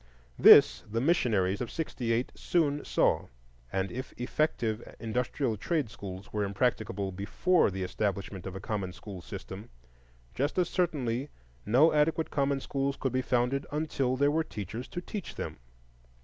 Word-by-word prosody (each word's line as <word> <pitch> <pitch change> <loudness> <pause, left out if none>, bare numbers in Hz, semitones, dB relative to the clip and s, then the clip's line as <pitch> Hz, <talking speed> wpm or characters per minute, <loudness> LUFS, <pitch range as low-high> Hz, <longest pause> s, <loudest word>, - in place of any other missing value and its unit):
This - - +8
the 115 +2 -1
missionaries 115 - +2
of 120 - -3
'68 120 -6 -2
soon 150 -4 0
saw; - - +2 0.4
and 95 0 -1
if 130 +2 -6
effective 120 -4 -1
industrial 120 +3 -1
and 105 -2 -5
trade 150 -6 0
schools 95 -1 -8
were 105 -1 0
impracticable 100 -1 -1
before 110 - +2
the 95 0 -4
establishment 100 0 -3
of 95 - -6
a - - -4
common 95 -2 -3
school 95 -2 -9
system, 95 +2 -8 0.6
just 145 +6 -1
as 180 -2 +2
certainly 140 -7 -1 0.4
no 135 +9 +5
adequate 155 +2 +2
common 140 -1 +1
schools 140 0 -2
could 130 -2 -2
be 130 - +2
founded 125 +2 0
until 145 -4 0
there 145 +2 +3
were 160 +2 +1
teachers 110 - -6
to 175 - -5
teach 200 +1 -6
them. - - -5
125 Hz, 150 wpm, -30 LUFS, 100-145 Hz, 0.6 s, This